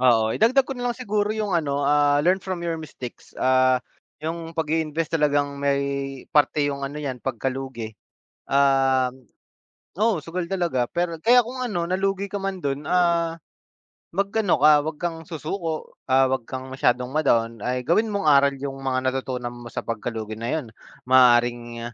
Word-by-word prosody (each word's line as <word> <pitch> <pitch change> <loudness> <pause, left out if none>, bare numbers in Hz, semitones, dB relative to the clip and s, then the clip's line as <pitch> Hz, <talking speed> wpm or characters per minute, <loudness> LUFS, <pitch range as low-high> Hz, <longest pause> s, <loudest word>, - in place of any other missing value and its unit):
Oo. 115 -3 +4
Idagdag 255 +4 +4
ko 270 - -5
na 245 0 -2
lang - - -5
siguro 210 -4 -1
yung 210 -3 -2
ano, 145 -4 0
ah, 145 0 +4
learn 185 +2 +3
from 180 -2 -4
your 165 -1 -1
mistakes. 130 -5 -10
Ah, 130 0 +3 0.4
yung 165 +1 -5
pag-iinvest 160 0 -1
talagang 145 -2 +1
may 140 -1 -1
parte 145 0 +3
yung 140 -1 -4
ano 140 +2 -5
yan, 130 -4 -4
pagkalugi. 130 -2 -4 0.5
Um, 135 -2 +2 0.7
oo, 215 -6 +2
sugal 170 +1 -3
talaga 170 -10 0
pero 170 -1 -2
kaya 245 +7 +5
kung 250 +3 -8
ano 175 -8 -2
nalugi 195 +1 0
ka 200 - -1
man 195 -1 -3
do'n, 140 +1 -2
ah, 170 -2 +2 0.8
mag-ano 200 0 +1
ka, 150 +1 +8
'wag 160 -1 -4
kang 170 -2 -2
susuko. 160 0 -4 0.2
Ah, 130 0 +5
'wag 130 -3 -1
kang 130 0 -5
masyadong 125 -1 +1
ma-down. 115 -7 +1
Ay, 125 +2 -1
gawin 215 +6 +2
mong 200 - -1
aral 140 0 +5
yung 135 0 -5
mga 130 -1 -1
natutunan 125 -2 -4
mo 120 0 -10
sa - - -3
pagkalugi 110 -1 -4
na 115 +1 -3
'yon. 155 -5 -2 0.4
Maaaring, 120 -2 +3
ah, 120 - -16
145 Hz, 165 wpm, -24 LUFS, 130-170 Hz, 0.8 s, ka